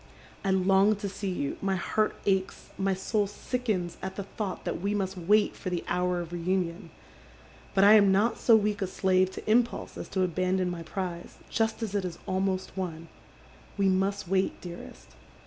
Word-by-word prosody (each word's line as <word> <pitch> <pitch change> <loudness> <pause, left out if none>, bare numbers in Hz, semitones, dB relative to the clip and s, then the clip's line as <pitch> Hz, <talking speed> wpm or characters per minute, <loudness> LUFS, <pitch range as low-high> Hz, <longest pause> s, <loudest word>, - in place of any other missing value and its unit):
" - - -24
I 195 - 0
long 190 +2 +4
to 205 0 -4
see 195 0 -4
you, 140 -6 -2
my 195 -1 +1
heart 215 +4 0
aches, 190 -1 0
my 195 0 0
soul 205 +2 0
sickens 205 -5 -2
at 190 0 -5
the 200 - -4
thought 195 -1 -5
that - - -3
we 200 +2 0
must 195 -1 -1
wait 205 +4 +2
for 185 - -5
the 175 -1 -2
hour 180 0 0
of 170 0 -8
reunion. 175 0 -1 0.9
But 195 - +5
I 205 +1 +9
am 200 -2 +7
not 205 +5 +2
so 230 - +6
weak 210 -1 +1
a 195 - 0
slave 185 0 +2
to - - -8
impulse 235 +2 +1
as - - -7
to 190 -1 0
abandon 185 +1 0
my 170 -1 -5
prize, 175 +1 -5
just 225 0 0
as 210 -3 -3
it 200 -2 0
is 180 -2 -5
almost 190 0 -1
won. 165 -3 -5 0.7
We 195 -1 +3
must 195 +1 0
wait, 190 +1 0
dearest. 175 -1 -10
190 Hz, 190 wpm, -28 LUFS, 180-200 Hz, 0.9 s, I